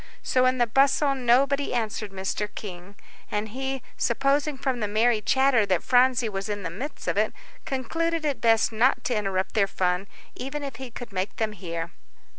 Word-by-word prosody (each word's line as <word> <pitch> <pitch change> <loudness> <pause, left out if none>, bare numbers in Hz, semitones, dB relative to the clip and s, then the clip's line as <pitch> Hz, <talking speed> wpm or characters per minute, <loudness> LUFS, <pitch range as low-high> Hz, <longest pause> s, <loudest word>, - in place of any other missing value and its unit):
So 255 0 +3
in 255 0 +2
the 240 - +4
bustle, 275 +4 +3
nobody 270 +2 +2
answered 220 -3 -2
Mr. 195 +2 -3
King. 185 -1 -8 0.3
And 210 +1 -2
he, 265 +2 -4
supposing 275 +4 +1
from 260 -2 -1
the 210 - -1
merry 220 +2 +2
chatter 265 +1 +3
that 185 -3 +1
Phronsie 250 -1 +4
was 195 -1 -4
in 205 -1 -3
the 165 - -3
midst 260 - -7
of - - 0
it, - - +2 0.3
concluded 325 +5 -1
it 285 -3 -1
best 225 -1 +4
not 235 +4 +2
to 245 - 0
interrupt 195 -3 -1
their 200 -3 +3
fun, 180 0 0 0.3
even 280 +3 -5
if 275 -2 -6
he 265 -2 -7
could 235 -2 -9
make 190 +2 -2
them 220 -1 -1
hear. 170 -4 -5
235 Hz, 185 wpm, -26 LUFS, 205-265 Hz, 0.3 s, the